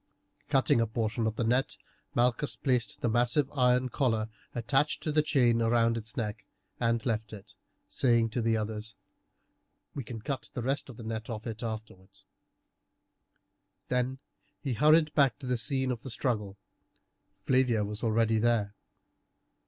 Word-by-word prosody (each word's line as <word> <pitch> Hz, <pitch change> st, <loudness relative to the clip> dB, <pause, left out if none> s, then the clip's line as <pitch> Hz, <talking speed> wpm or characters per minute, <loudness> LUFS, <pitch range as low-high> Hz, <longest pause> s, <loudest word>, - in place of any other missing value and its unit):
Cutting 135 Hz, -4 st, +3 dB
a 115 Hz, -, +1 dB
portion 110 Hz, 0 st, -1 dB
of 110 Hz, -, -2 dB
the 120 Hz, -, -1 dB
net 125 Hz, +4 st, +1 dB, 0.4 s
Malchus 125 Hz, +4 st, +2 dB
placed 125 Hz, -6 st, -1 dB
the -, -, +1 dB
massive 120 Hz, +5 st, +2 dB
iron 125 Hz, -2 st, +3 dB
collar 115 Hz, -5 st, 0 dB, 0.3 s
attached 135 Hz, +6 st, +1 dB
to 155 Hz, -, -1 dB
the 155 Hz, +1 st, +4 dB
chain 125 Hz, -6 st, +3 dB
round 115 Hz, 0 st, +3 dB
its 110 Hz, -1 st, -5 dB
neck 105 Hz, -4 st, -3 dB, 0.4 s
and 115 Hz, -1 st, +2 dB
then 115 Hz, -, -6 dB
left 110 Hz, -2 st, -2 dB
it, 105 Hz, 0 st, -11 dB, 0.3 s
saying 115 Hz, -3 st, +2 dB
to 120 Hz, -, -1 dB
the 115 Hz, 0 st, +2 dB
others: 110 Hz, 0 st, -4 dB, 1.0 s
"We 140 Hz, -, -4 dB
can 115 Hz, 0 st, -7 dB
cut 130 Hz, 0 st, -4 dB
the 120 Hz, -, -3 dB
rest 135 Hz, +2 st, -1 dB
of 120 Hz, -, -10 dB
the 115 Hz, -, -8 dB
net 110 Hz, +1 st, -5 dB
off 110 Hz, -1 st, -5 dB
it 115 Hz, -2 st, -5 dB
afterwards." 110 Hz, -4 st, -7 dB, 1.6 s
He -, -, -36 dB
then 125 Hz, +1 st, 0 dB, 0.6 s
hurried 155 Hz, +1 st, +5 dB
back 140 Hz, -5 st, +3 dB
to 140 Hz, -, -10 dB
the 125 Hz, 0 st, 0 dB
scene 130 Hz, +3 st, 0 dB
of 120 Hz, -, -4 dB
the 135 Hz, -, -7 dB
struggle. 105 Hz, -6 st, -2 dB, 0.9 s
Flavia 125 Hz, -5 st, +3 dB
was 105 Hz, +2 st, -5 dB
already 115 Hz, 0 st, +2 dB
there. 110 Hz, -3 st, +1 dB
115 Hz, 160 wpm, -30 LUFS, 110-130 Hz, 1.6 s, hurried